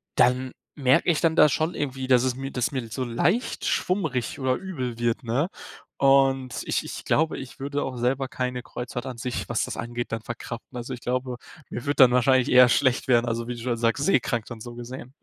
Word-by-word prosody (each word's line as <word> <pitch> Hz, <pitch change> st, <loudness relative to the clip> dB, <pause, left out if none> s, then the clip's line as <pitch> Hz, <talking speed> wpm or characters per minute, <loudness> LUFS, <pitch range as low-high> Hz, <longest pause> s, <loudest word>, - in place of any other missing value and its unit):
dann 125 Hz, +1 st, +3 dB, 0.3 s
merke 130 Hz, +5 st, +3 dB
ich 155 Hz, -, -1 dB
dann 165 Hz, -1 st, +2 dB
da 150 Hz, -2 st, +7 dB
schon 155 Hz, +5 st, 0 dB
irgendwie, 135 Hz, -2 st, -3 dB
dass 125 Hz, -2 st, +5 dB
es 130 Hz, -1 st, 0 dB
mir 135 Hz, +1 st, -5 dB
dass 125 Hz, -2 st, -1 dB
mir 130 Hz, -4 st, -3 dB
so 125 Hz, +4 st, -3 dB
leicht 170 Hz, -, 0 dB
schwummrig 160 Hz, -10 st, -1 dB
oder 130 Hz, -1 st, +1 dB
übel 130 Hz, -11 st, -5 dB
wird, 120 Hz, +2 st, 0 dB
ne, 125 Hz, +9 st, 0 dB, 0.5 s
und 135 Hz, -2 st, +3 dB
ich -, -, 0 dB
ich -, -, -7 dB
glaube, 160 Hz, +1 st, +1 dB
ich 130 Hz, -2 st, -10 dB
würde 140 Hz, +1 st, -2 dB
auch 130 Hz, -2 st, -5 dB
selber 130 Hz, +3 st, 0 dB
keine 125 Hz, -1 st, -3 dB
Kreuzfahrt 125 Hz, 0 st, -6 dB
an 130 Hz, -2 st, -6 dB
sich, 125 Hz, +2 st, -4 dB
was 120 Hz, -, 0 dB
das -, -, -6 dB
angeht, 120 Hz, +1 st, -4 dB
dann 115 Hz, 0 st, -2 dB
verkraften. 120 Hz, +1 st, -7 dB
Also, 120 Hz, +1 st, -5 dB
ich 125 Hz, -, -8 dB
glaube, 125 Hz, 0 st, -2 dB, 0.3 s
mir 120 Hz, -, -5 dB
würde 145 Hz, 0 st, 0 dB
dann 130 Hz, -2 st, +7 dB
wahrscheinlich 125 Hz, 0 st, +3 dB
eher 125 Hz, 0 st, +8 dB
schlecht 130 Hz, +1 st, +2 dB
werden, 120 Hz, -2 st, +4 dB
also, 115 Hz, 0 st, -2 dB
wie 125 Hz, -, -3 dB
du 120 Hz, -, -9 dB
schon 120 Hz, 0 st, -1 dB
sagst, 115 Hz, +4 st, +1 dB
seekrank 120 Hz, -, +1 dB
dann 120 Hz, -2 st, -8 dB
so 120 Hz, +1 st, -8 dB
gesehen. 120 Hz, +1 st, -8 dB
125 Hz, 215 wpm, -25 LUFS, 120-135 Hz, 0.5 s, eher